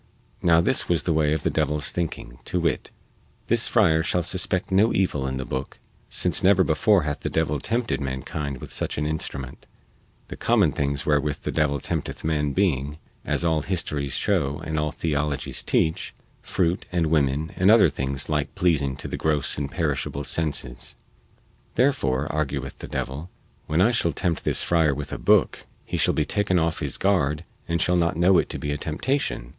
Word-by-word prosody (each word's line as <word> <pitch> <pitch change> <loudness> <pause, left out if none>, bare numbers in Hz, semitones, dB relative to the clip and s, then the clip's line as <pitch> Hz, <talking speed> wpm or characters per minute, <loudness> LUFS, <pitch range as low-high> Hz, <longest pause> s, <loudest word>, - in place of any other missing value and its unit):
Now 85 -1 +5
this - - +1
was 85 -5 +2
the 85 - +1
way 75 -1 +2
of 75 -2 0
the - - +1
devil's 75 0 0
thinking, 80 -8 -4
to 90 - -1
wit: 85 -2 -1 0.6
This 115 0 +2
friar 85 -9 +3
shall 90 +2 0
suspect 95 +2 -1
no 100 +4 +4
evil 75 -8 0
in 65 0 -3
the 65 - -4
booke, 65 +2 -5 0.3
since - - +2
never 95 0 +5
before 90 +4 +3
hath 75 0 -3
the - - -3
devil 75 -2 0
tempted 115 - -1
mankind 70 +1 -4
with - - -6
such - - -2
an 75 - -1
instrument, 70 -4 -5 0.6
the - - -6
common - - +3
things 70 0 -1
wherewith 75 -1 +1
the - - -2
devil 75 -2 +1
tempteth - - -3
man 75 -2 0
being 75 -5 0 0.3
(as - - -1
all 80 -2 +2
histories 75 -6 -2
show 75 -8 0
and 80 -1 -2
all 75 0 -1
theologies 75 -3 -2
teach) 80 0 0 0.3
fruit 90 -1 -1
and 85 -2 +1
women 75 0 +1
and 95 +2 +3
other 110 -2 +7
like 75 - +1
things 65 0 -2 0.3
pleasing 80 -8 +1
to - - -6
the - - -4
gross 75 -3 0
and 70 -1 -3
perishable 75 -4 -2
senses. 70 -5 -2 0.8
Therefore, 95 - +2
argueth 75 -2 -3
the - - -7
devil, 75 +7 -4 0.4
when 80 +3 +2
I 110 +6 +5
shall 85 -9 +1
tempt 85 +3 -1
this - - +1
friar 80 -4 +2
with 75 0 -5
a - - -4
booke - - +2 0.2
he - - -3
shall - - +2
be - - +1
taken 100 -3 +1
off 80 -1 0
his - - -2
guard 80 -6 +1 0.2
and 85 0 0
shall 90 - +2
not 85 -2 +1
know 90 +1 +5
it - - -1
to - - -4
be 75 - -3
a 75 - -1
temptation. 80 - -2
80 Hz, 185 wpm, -24 LUFS, 70-90 Hz, 0.8 s, other